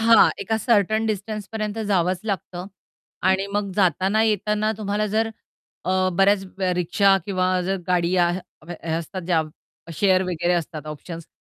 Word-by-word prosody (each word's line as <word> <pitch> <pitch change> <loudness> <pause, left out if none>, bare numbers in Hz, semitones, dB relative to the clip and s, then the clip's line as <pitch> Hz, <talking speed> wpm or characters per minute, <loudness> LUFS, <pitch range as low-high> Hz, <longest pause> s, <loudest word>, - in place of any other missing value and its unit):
हां, 225 -1 +7
एका 220 -1 -1
सर्टन 220 -1 +2
डिस्टन्सपर्यंत 215 +1 -3
जावंच 180 -2 +1
लागतं 180 -2 -4 0.6
आणि 190 +1 +2
मग 205 -1 0
जाताना-येताना 210 +3 +2
तुम्हाला 210 0 -1
जर 220 +2 0 0.5
अ, 185 +1 +2
बऱ्याच 195 +2 +3 0.3
रिक्षा 195 +3 +3
किंवा 185 -1 +1
जर 195 +2 -1
गाडी 180 0 +2
हे 175 -2 -2
असतात 170 +3 -5
ज्या 165 -3 +3 0.5
शेअर 190 0 +3
वगैरे 175 0 0
असतात 160 -2 -4
ऑप्शन्स 165 +2 -8
190 Hz, 125 wpm, -23 LUFS, 175-210 Hz, 0.6 s, हां